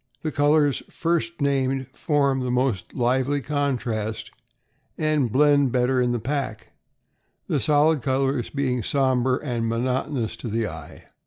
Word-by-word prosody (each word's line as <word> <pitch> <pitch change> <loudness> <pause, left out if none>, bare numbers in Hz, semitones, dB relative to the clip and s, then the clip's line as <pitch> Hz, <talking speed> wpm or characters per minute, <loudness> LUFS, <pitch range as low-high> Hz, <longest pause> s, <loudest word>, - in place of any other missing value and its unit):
The 155 - -1
colors 145 0 +2
first 170 0 -1
named 135 -1 +1
form 140 -3 +1
the 125 -1 -2
most 125 -5 -1
lively 130 +3 +1
contrast 125 -7 -2 0.7
and 150 -6 +1
blend 145 0 +4
better 125 +1 +2
in 125 -1 +1
the 120 - 0
pack, 115 -3 -3 0.8
the 155 -6 0
solid 150 +4 +3
colors 135 0 0
being 130 -3 -1
somber 130 -1 +1
and 120 -5 -2
monotonous 125 0 -1
to 120 - -7
the 115 0 -1
eye. 80 -3 -10
130 Hz, 135 wpm, -24 LUFS, 120-145 Hz, 0.8 s, blend